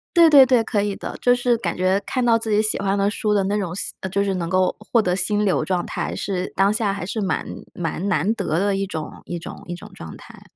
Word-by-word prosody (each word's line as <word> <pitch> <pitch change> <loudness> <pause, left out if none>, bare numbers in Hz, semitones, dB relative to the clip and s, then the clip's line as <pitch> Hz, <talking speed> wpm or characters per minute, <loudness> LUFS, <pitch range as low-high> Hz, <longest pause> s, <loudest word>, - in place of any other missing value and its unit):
对 335 -1 +8
对 280 -3 +9
对， 245 -3 +3
可 210 -2 0
以 205 -1 -2
的， - - -7
就 245 0 +4
是 245 -1 +1
感 175 -6 -3
觉 185 +2 +2
看 255 -2 -1
到 230 -1 +4
自 225 -1 -5
己 210 0 +3
喜 215 -2 +1
欢 200 0 0
的 200 +1 +2
书 210 -1 -1
的 200 -2 +2
那 205 +2 0
种 175 -3 -4
吸 - - -2
呃， 190 - -4
就 200 +2 0
是 195 -1 -1
能 170 -2 -3
够 185 0 +1 0.2
获 235 - +5
得 180 -2 0
心 205 +3 +1
流 190 - +1
状 180 -2 -1
态， - - -4
是 185 -2 -3
当 195 +2 +3
下 215 -3 0
还 195 -3 -4
是 215 +3 -3
蛮 190 - -1 0.3
蛮 175 +3 -3
难 185 +4 +1
得 165 -8 -2
的 200 0 +1
一 195 0 -2
种 160 -5 -6
一 175 - -4
种 170 - -9
一 175 - -4
种 - - -12
状 80 -1 -9
态。 - - -15
195 Hz, 290 characters per minute, -22 LUFS, 180-215 Hz, 0.3 s, 对